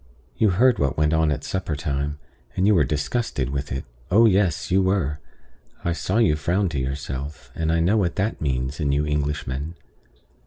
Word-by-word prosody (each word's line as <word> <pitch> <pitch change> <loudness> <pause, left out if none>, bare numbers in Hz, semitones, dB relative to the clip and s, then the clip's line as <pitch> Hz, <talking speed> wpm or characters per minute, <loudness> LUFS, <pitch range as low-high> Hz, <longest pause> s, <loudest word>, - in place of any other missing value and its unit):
You 110 - +3
heard 120 +7 +4
what 70 0 0
went 75 0 +2
on 80 -1 +3
at 75 -1 -2
supper 95 -5 -2
time; 70 -1 -2 0.4
and 95 - +2
you 105 - +5
were 85 -6 +4
disgusted 75 - -1
with 70 +1 -3
it. 65 +1 -3 0.2
Oh 110 +6 +6
yes, 95 -8 +2
you 95 +1 +4
were! 95 -6 0 0.7
I 85 - +1
saw 95 +4 -1
you 110 -10 +4
frown 90 +6 0
to 75 -4 -2
yourself; 65 0 -5
and 80 0 -1
I 85 0 +2
know 95 +7 +3
what 90 -5 +1
that 100 +4 -1
means 65 0 -1
in 75 -3 +1
you 70 +1 +1
Englishmen." 75 +1 -2
75 Hz, 190 wpm, -23 LUFS, 70-95 Hz, 0.7 s, Oh